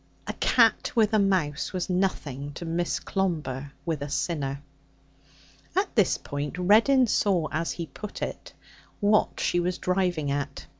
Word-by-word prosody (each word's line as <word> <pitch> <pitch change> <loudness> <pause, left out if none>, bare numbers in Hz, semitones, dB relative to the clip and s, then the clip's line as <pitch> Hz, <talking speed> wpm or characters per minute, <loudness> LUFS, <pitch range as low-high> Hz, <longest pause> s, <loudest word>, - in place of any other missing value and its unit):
A - - -3
cat 230 -3 +3
with 220 -2 +3
a 215 - +5
mouse 180 -7 0
was 180 -2 -2
nothing 145 -7 -2
to 170 - -7
Miss 170 +1 -1
Clomber 150 -8 -2
with 160 -4 -2
a 145 - -4
sinner. 140 -3 -2 1.1
At 385 +1 0
this 210 -6 +3
point 145 +3 -5
Reddin 225 +8 +5
saw, 190 -7 +2
as 165 +2 -1
he 170 - -5
put 210 +5 -7
it, - - -6 0.5
what 210 0 +2
she 175 - +1
was 175 +1 -1
driving 180 -6 0
at. 140 0 -3
175 Hz, 150 wpm, -27 LUFS, 145-200 Hz, 1.1 s, a